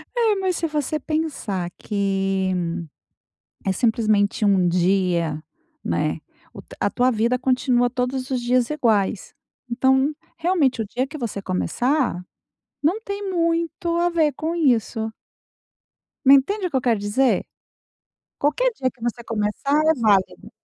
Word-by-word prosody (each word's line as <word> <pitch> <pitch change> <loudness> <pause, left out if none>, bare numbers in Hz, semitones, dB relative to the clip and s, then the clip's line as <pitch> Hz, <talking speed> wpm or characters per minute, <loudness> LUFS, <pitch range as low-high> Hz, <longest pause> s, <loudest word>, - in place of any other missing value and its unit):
É, 455 -3 +3
mais 375 -2 -1
se 330 - -1
você 300 0 -2
pensar 285 - -2
que 195 -2 -1 1.1
é, 195 - +1
simplesmente, 215 -1 +1
um 195 -3 +3
dia, 175 -3 +1 0.4
né. - - -1 0.3
O - - -9
t - - -15
a - - +1
tua 250 +1 +2
vida 235 +2 +1
continua 250 -1 +2
todos 255 +1 -3
os 255 -2 0
dias 245 0 +1
iguais. 220 -9 0 0.4
Então, 265 +4 +2 0.2
realmente 325 -8 +1
o - - -4
dia 250 +6 -2
que 295 +3 -9
você 235 -7 -4
começar, 240 - 0 0.6
não 355 +9 +1
tem 400 -2 -5
muito 335 -1 0
a 345 +1 +2
ver 320 -3 +2
com 315 +4 -3
isso. 230 -7 +1 1.1
Me 270 +1 +9
entende 375 +8 +1
o - - -7
que - - -4
eu - - 0
quero 235 -4 +1
dizer? 215 +6 +1 0.9
Qualquer - - +2
dia 260 -10 -1
que 250 - -30
você 235 0 -3
começar 225 +7 0
é 320 - +5
válido. 210 -7 +1
250 Hz, 140 wpm, -22 LUFS, 210-310 Hz, 1.1 s, Me